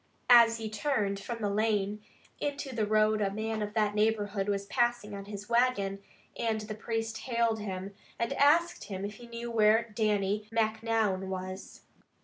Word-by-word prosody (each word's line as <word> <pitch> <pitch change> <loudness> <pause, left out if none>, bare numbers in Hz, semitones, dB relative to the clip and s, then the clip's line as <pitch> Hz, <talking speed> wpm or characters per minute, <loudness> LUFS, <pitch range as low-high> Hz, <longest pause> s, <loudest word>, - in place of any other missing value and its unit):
As 230 -1 +8
he 225 -1 -4
turned 210 -3 -1
from 230 +2 -6
the 205 - +1
lane 210 -1 0 0.4
into 285 -2 -3
the 220 -3 0
road 215 0 +3
a 200 - +2
man 220 +2 -3
of 210 +1 -4
that 210 -2 +2
neighborhood 210 -2 0
was 200 -1 -1
passing 240 -1 0
on 200 0 -6
his 205 0 -8
wagon, 235 -5 +1 0.4
and 225 -2 -1
the 215 0 -6
priest 225 +1 -3
hailed 235 -3 0
him, 195 -1 -5 0.2
and 235 +4 -1
asked 295 -2 +3
if 200 +1 -4
he 240 -1 -12
knew 235 0 -6
where 225 +1 +3
Dannie 210 -1 0
Macnoun 220 -3 0
was. 185 0 -6
215 Hz, 160 wpm, -30 LUFS, 205-230 Hz, 0.4 s, As